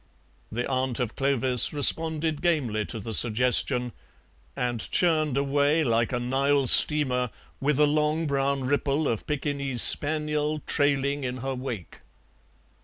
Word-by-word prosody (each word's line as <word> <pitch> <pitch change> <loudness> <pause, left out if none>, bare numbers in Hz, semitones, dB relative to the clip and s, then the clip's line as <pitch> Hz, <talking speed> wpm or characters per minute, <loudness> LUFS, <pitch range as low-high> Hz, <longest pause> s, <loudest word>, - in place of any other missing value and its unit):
The 120 +2 -4
aunt 130 -2 -2
of 120 -3 -4
Clovis 130 -3 +2
responded 160 +1 +1
gamely 130 -12 -2
to 115 - -6
the 110 +2 -7
suggestion, 125 +2 +2 0.6
and 120 -2 -2
churned 155 -6 0
away 145 +3 0
like 115 -3 -1
a 125 - -3
Nile 135 +3 -1
steamer, 125 -2 +4 0.3
with 145 +1 -1
a 150 - +4
long 150 +2 -1
brown 140 -1 -2
ripple 145 +2 -2
of 115 - -4
Pekingese 140 -4 +1
spaniel 150 0 +2
trailing 140 0 -1
in 125 0 -5
her 135 - -3
wake. 125 -8 -8
140 Hz, 130 wpm, -24 LUFS, 125-150 Hz, 0.6 s, steamer